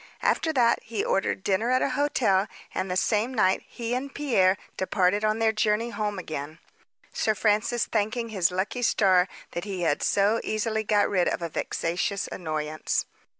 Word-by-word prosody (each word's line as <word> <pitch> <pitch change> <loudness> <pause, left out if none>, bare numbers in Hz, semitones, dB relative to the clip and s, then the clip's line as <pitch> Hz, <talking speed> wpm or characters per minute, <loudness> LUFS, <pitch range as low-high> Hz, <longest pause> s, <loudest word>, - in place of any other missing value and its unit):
After 320 - +2
that, 240 -4 +3
he 220 -2 -3
ordered 190 0 0
dinner 200 +4 +1
at 255 0 +3
a - - 0
hotel, 235 -9 +2 0.3
and 190 - -2
the 180 - -1
same 215 +5 +1
night 190 -6 +2
he 235 -1 -4
and 265 +3 -3
Pierre 200 -11 +2 0.2
departed 190 +2 +1
on 215 0 +2
their 225 -1 +3
journey 215 +2 0
home 210 -3 -2
again, 155 -3 -6 0.6
Sir 220 - +1
Francis 215 +3 +1
thanking 225 +2 -1
his 190 -6 +2
lucky 190 +7 -2
star 190 -6 +3 0.2
that 175 - -4
he 195 -3 -4
had 145 -3 +1
so 205 +3 +2
easily 220 0 -1
got 205 -1 +2
rid 185 -3 +1
of - - -1
a 170 - -2
vexatious 180 +6 -2
annoyance. 155 -2 -2
210 Hz, 170 wpm, -26 LUFS, 185-230 Hz, 0.6 s, that